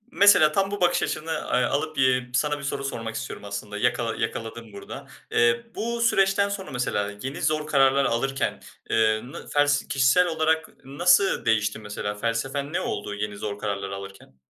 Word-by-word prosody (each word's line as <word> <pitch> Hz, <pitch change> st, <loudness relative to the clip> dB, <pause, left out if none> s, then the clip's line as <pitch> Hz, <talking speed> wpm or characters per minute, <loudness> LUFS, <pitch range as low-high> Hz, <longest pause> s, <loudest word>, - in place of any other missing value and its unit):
Mesela 200 Hz, -, +6 dB
tam 195 Hz, +4 st, 0 dB
bu 205 Hz, -, -4 dB
bakış 175 Hz, -, +3 dB
açını 160 Hz, +1 st, -3 dB
a 125 Hz, -5 st, 0 dB
alıp, 155 Hz, +2 st, -2 dB
eee, 130 Hz, -1 st, +2 dB
sana 150 Hz, +4 st, +1 dB
bir -, -, -9 dB
soru 140 Hz, 0 st, -3 dB
sormak 115 Hz, -4 st, -4 dB
istiyorum 110 Hz, -, -6 dB
aslında; 100 Hz, +1 st, -6 dB
yakala 120 Hz, 0 st, 0 dB
yakaladım 115 Hz, -1 st, -5 dB
burada. 100 Hz, -, -9 dB, 0.2 s
Eee, 120 Hz, 0 st, +3 dB
bu 235 Hz, +1 st, -2 dB
süreçten 200 Hz, -3 st, +3 dB
sonra 200 Hz, -1 st, -5 dB
mesela 105 Hz, -5 st, -1 dB
yeni 135 Hz, +2 st, -5 dB
zor 155 Hz, 0 st, 0 dB
kararlar 135 Hz, -2 st, +4 dB
alırken, 135 Hz, +1 st, -1 dB, 0.3 s
ııı, 110 Hz, +2 st, +1 dB
nı -, -, -9 dB
fels 145 Hz, 0 st, +2 dB
kişisel 135 Hz, +7 st, +3 dB
olarak 160 Hz, -1 st, 0 dB, 0.2 s
nasıl 180 Hz, +8 st, +3 dB
değişti 105 Hz, -2 st, +1 dB
mesela? 105 Hz, -1 st, -5 dB
Felsefen 135 Hz, +7 st, -2 dB
ne -, -, 0 dB
oldu 105 Hz, -, -4 dB
yeni 105 Hz, 0 st, -4 dB
zor 100 Hz, 0 st, -5 dB
kararlar 100 Hz, -2 st, -3 dB
alırken? 95 Hz, -9 st, -10 dB
130 Hz, 170 wpm, -25 LUFS, 110-155 Hz, 0.3 s, Mesela